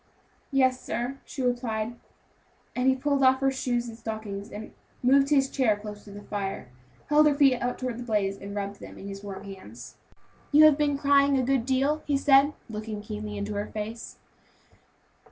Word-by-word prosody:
"Yes 260 Hz, -2 st, +3 dB
sir," 250 Hz, +3 st, -3 dB
she 270 Hz, -, -5 dB
replied, 240 Hz, -2 st, -1 dB, 0.8 s
and 250 Hz, +1 st, +1 dB
he 265 Hz, -, +5 dB
pulled 280 Hz, +1 st, 0 dB
off 260 Hz, 0 st, +5 dB
her 270 Hz, 0 st, +2 dB
shoes 245 Hz, -2 st, -1 dB
and 230 Hz, -, -8 dB
stockings, 215 Hz, -3 st, -6 dB
and 215 Hz, +1 st, -8 dB, 0.3 s
moving 275 Hz, +2 st, +5 dB
his 275 Hz, -2 st, +3 dB
chair 245 Hz, -7 st, +1 dB
closer 210 Hz, 0 st, -9 dB
to 205 Hz, -, -11 dB
the -, -, -13 dB
fire, 195 Hz, -10 st, -4 dB, 0.4 s
held 300 Hz, 0 st, +6 dB
her 290 Hz, -, +3 dB
feet 275 Hz, -4 st, +4 dB
out 245 Hz, 0 st, -1 dB
toward 250 Hz, -2 st, -4 dB
the -, -, -5 dB
blaze, 205 Hz, -4 st, 0 dB
and 200 Hz, +1 st, -8 dB
rubbed 200 Hz, 0 st, -4 dB
them -, -, -11 dB
in 195 Hz, -, -9 dB
his 195 Hz, 0 st, -8 dB
warm 195 Hz, -1 st, -7 dB
hands. 130 Hz, -, -11 dB, 0.5 s
"You 300 Hz, +1 st, +7 dB
have 305 Hz, -2 st, +7 dB
been 290 Hz, -1 st, +1 dB
crying 280 Hz, -1 st, +4 dB
a 260 Hz, -, +1 dB
good 260 Hz, -2 st, +1 dB
deal," 275 Hz, +4 st, +1 dB
he 285 Hz, -2 st, +2 dB
said, 275 Hz, +1 st, +5 dB
looking 215 Hz, -1 st, -6 dB
keenly 210 Hz, -1 st, -6 dB
into 205 Hz, +1 st, -3 dB
her 205 Hz, +1 st, -3 dB
face. 220 Hz, +2 st, -6 dB
245 Hz, 190 wpm, -27 LUFS, 210-275 Hz, 0.8 s, You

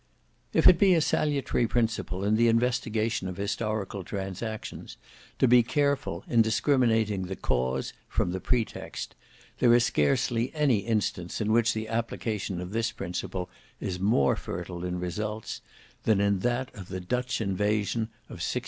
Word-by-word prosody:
If 160 Hz, -, +4 dB
it 180 Hz, -2 st, +8 dB
be 190 Hz, -3 st, +6 dB
a -, -, +4 dB
salutary 145 Hz, -6 st, +1 dB
principle 110 Hz, -5 st, -1 dB
in 105 Hz, +1 st, +2 dB
the 115 Hz, +1 st, +4 dB
investigation 115 Hz, -3 st, +1 dB
of 95 Hz, -, -6 dB
historical 100 Hz, -1 st, -2 dB
transactions 100 Hz, +4 st, -5 dB, 0.4 s
to 130 Hz, -, +4 dB
be 120 Hz, 0 st, +7 dB
careful 140 Hz, -, 0 dB
in 115 Hz, -, +4 dB
discriminating 110 Hz, -5 st, +2 dB
the 95 Hz, -, -4 dB
cause 65 Hz, -2 st, -1 dB, 0.2 s
from 90 Hz, -, 0 dB
the 95 Hz, -, -3 dB
pretext, 115 Hz, +4 st, -2 dB, 0.5 s
there 120 Hz, -1 st, +6 dB
is 120 Hz, 0 st, +4 dB
scarcely 120 Hz, -, +1 dB
any 145 Hz, -6 st, +3 dB
instance 100 Hz, -5 st, -1 dB
in 110 Hz, -1 st, 0 dB
which 115 Hz, +1 st, +3 dB
the 110 Hz, 0 st, -3 dB
application 110 Hz, -4 st, -2 dB
of 90 Hz, +1 st, -6 dB
this 115 Hz, +1 st, 0 dB
principle 90 Hz, +1 st, -4 dB, 0.3 s
is 90 Hz, -2 st, -3 dB
more 95 Hz, -8 st, +3 dB
fertile 90 Hz, 0 st, -6 dB
in 90 Hz, 0 st, -2 dB
results, 105 Hz, +5 st, -4 dB, 0.4 s
than 110 Hz, -3 st, +2 dB
in 100 Hz, -1 st, +2 dB
that 120 Hz, +4 st, -1 dB
of 100 Hz, -6 st, -9 dB
the 95 Hz, -1 st, -5 dB
Dutch 125 Hz, +7 st, -2 dB
invasion 105 Hz, +2 st, 0 dB, 0.2 s
of -, -, -10 dB
1688. -, -, 0 dB
110 Hz, 155 wpm, -28 LUFS, 95-120 Hz, 0.5 s, it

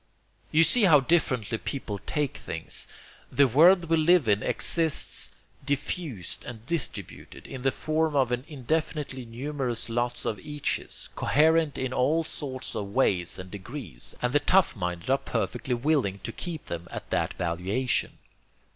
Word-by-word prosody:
You 160 Hz, +2 st, +6 dB
see 210 Hz, +7 st, +4 dB
how 155 Hz, -6 st, +7 dB
differently 130 Hz, -, +1 dB
people 110 Hz, -8 st, -4 dB
take 150 Hz, -4 st, -1 dB
things. -, -, -4 dB, 0.4 s
The 140 Hz, -1 st, +5 dB
world 170 Hz, +8 st, +6 dB
we 165 Hz, 0 st, +2 dB
live 160 Hz, -3 st, +4 dB
in 105 Hz, -1 st, +3 dB
exists 160 Hz, +5 st, +2 dB, 0.3 s
diffused 140 Hz, -, -3 dB
and 115 Hz, -2 st, -9 dB
distributed, 165 Hz, 0 st, -4 dB
in 130 Hz, -, -7 dB
the 135 Hz, -, +3 dB
form 155 Hz, +2 st, 0 dB
of 130 Hz, -3 st, +3 dB
an 125 Hz, +1 st, -1 dB
indefinitely 150 Hz, -2 st, -2 dB
numerous 125 Hz, 0 st, -3 dB
lot 120 Hz, +1 st, -1 dB
of 105 Hz, -, -2 dB
eaches, 150 Hz, +3 st, -4 dB
coherent 160 Hz, 0 st, +3 dB
in 130 Hz, -1 st, -2 dB
all 150 Hz, +6 st, +2 dB
sorts 135 Hz, -4 st, -5 dB
of 100 Hz, -, -3 dB
ways 90 Hz, -10 st, +2 dB
and 90 Hz, 0 st, -9 dB
degrees; 100 Hz, -, -6 dB
and 125 Hz, +1 st, +1 dB
the 145 Hz, -, +5 dB
tough 185 Hz, +4 st, +3 dB
minded 90 Hz, +2 st, -3 dB
are 135 Hz, -, +3 dB
perfectly 130 Hz, -5 st, -2 dB
willing 125 Hz, -6 st, +1 dB
to 115 Hz, -, -4 dB
keep 170 Hz, +5 st, -6 dB
them 85 Hz, 0 st, -5 dB
at -, -, -7 dB
that -, -, 0 dB
valuation. 95 Hz, +9 st, -1 dB
135 Hz, 150 wpm, -27 LUFS, 115-155 Hz, 0.4 s, how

